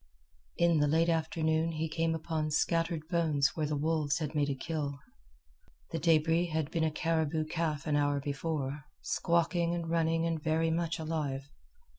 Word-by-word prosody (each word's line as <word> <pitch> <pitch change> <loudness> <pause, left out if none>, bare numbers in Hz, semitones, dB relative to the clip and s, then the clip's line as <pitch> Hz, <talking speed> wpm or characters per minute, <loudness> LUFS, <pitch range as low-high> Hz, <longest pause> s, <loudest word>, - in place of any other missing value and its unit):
In 170 -2 +4
the 145 - +3
late 165 +3 +3
afternoon 160 0 +1
he 160 +1 -1
came 165 +1 0
upon 160 -1 -2
scattered 165 +1 0
bones 160 -5 +2
where 155 -2 0
the 150 - -1
wolves 150 -1 +1
had 155 -2 -3
made 145 -2 +1
a 140 - -1
kill. 145 0 -3 0.9
The 165 - -2
debris 165 +2 +3
had 160 -2 -2
been 165 - 0
a 160 - +3
caribou 160 -1 0
calf 155 -2 -2
an 150 -2 +1
hour 145 -1 +2
before, 145 0 -3 0.2
squawking 170 0 +1
and 170 -1 -3
running 165 0 +2
and 165 -2 -1
very 160 +1 +1
much 165 0 -1
alive. 145 -4 -3
160 Hz, 165 wpm, -31 LUFS, 150-165 Hz, 0.9 s, In